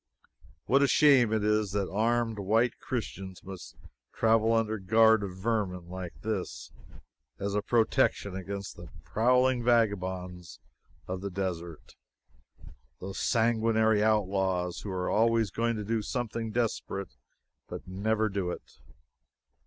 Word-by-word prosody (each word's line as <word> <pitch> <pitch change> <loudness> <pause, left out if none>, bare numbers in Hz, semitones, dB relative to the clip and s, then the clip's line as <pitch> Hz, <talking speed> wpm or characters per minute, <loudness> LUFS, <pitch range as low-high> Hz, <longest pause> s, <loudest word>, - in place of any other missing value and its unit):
What 135 +2 +3
a 140 - +5
shame 130 -4 +5
it 110 -1 +1
is 105 -2 +1
that 100 -2 0
armed 115 +1 0
white 115 +5 +1
Christians 95 -6 -5
must 95 -1 -9 0.4
travel 115 0 +3
under 110 -1 +1
guard 110 +3 +5
of 95 -2 -6
vermin 95 -4 -2
like 90 -1 -7
this 105 -4 -4 0.7
as 100 0 -3
a 105 - +1
protection 110 -4 +1
against 100 +1 -6
the 85 -2 -10
prowling 125 +2 +2
vagabonds 95 -7 0 0.5
of 95 0 -4
the 100 - -3
desert 90 -4 -5 1.1
those 95 +1 -6
sanguinary 110 -2 +2
outlaws 95 -4 +1
who 105 - -7
are 90 -1 -2
always 115 -1 +2
going 115 +1 0
to 105 - -4
do 110 +2 -1
something 115 0 -3
desperate, 105 - -3 0.5
but - - -8
never 110 +4 0
do 95 -3 -2
it. - - -9
105 Hz, 130 wpm, -29 LUFS, 95-115 Hz, 1.1 s, a